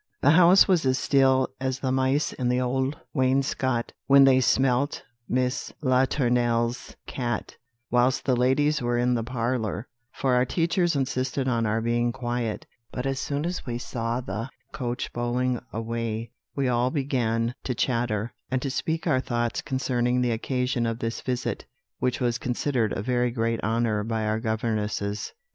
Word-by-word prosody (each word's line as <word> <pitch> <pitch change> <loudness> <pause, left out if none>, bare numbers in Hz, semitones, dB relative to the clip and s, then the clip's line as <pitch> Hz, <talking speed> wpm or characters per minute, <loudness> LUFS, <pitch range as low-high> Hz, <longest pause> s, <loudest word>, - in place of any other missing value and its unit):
"The 145 - +6
house 180 +3 +7
was 180 -4 +3
as 130 -1 +2
still 130 -1 +3
as 130 -1 -1
the 130 -2 -1
mice 130 +3 +1
in 125 -2 -1
the 125 0 +2
old 130 +3 0 0.2
wainscot 130 -2 0
when 140 0 +8
they 130 -1 +6
smelt 130 +2 +2 0.3
Miss 125 0 -1
Latournelle's 125 -3 +1
cat, 120 -4 -3 0.4
whilst 125 +2 +2
the 130 - +3
ladies 140 +4 +2
were 120 0 0
in 125 +1 +2
the 115 -2 0
parlour, 115 -2 -2 0.2
for 130 -2 0
our 125 0 +4
teachers 170 +4 +1
insisted 130 0 -1
on 115 -3 +1
our 110 +1 0
being 120 +1 +1
quiet; 120 -2 -3 0.3
but 125 - -4
as 135 -1 -1
soon 145 +3 -2
as 180 -3 -4
we 120 -1 -2
saw 120 0 -3
the 115 0 -4 0.2
coach 125 0 -4
bowling 120 +1 -1
away, 115 0 -3 0.2
we 140 -2 0
all 125 0 +2
began 120 -5 0
to 125 - -1
chatter, 115 -3 -1 0.2
and 130 - 0
to 135 - -1
speak 160 +4 -2
our 145 -7 +3
thoughts 120 -2 -1
concerning 125 -2 0
the 125 -1 +1
occasion 125 +1 -1
of 115 0 -2
this 115 -1 -3
visit, 125 -1 -3 0.3
which 125 0 0
was 120 -2 0
considered 125 -3 0
a 95 - -3
very 125 +1 +1
great 115 -1 -1
honour 110 -1 +1
by 110 0 -2
our 110 +1 0
governesses." 110 -2 -2
125 Hz, 160 wpm, -26 LUFS, 115-130 Hz, 0.4 s, when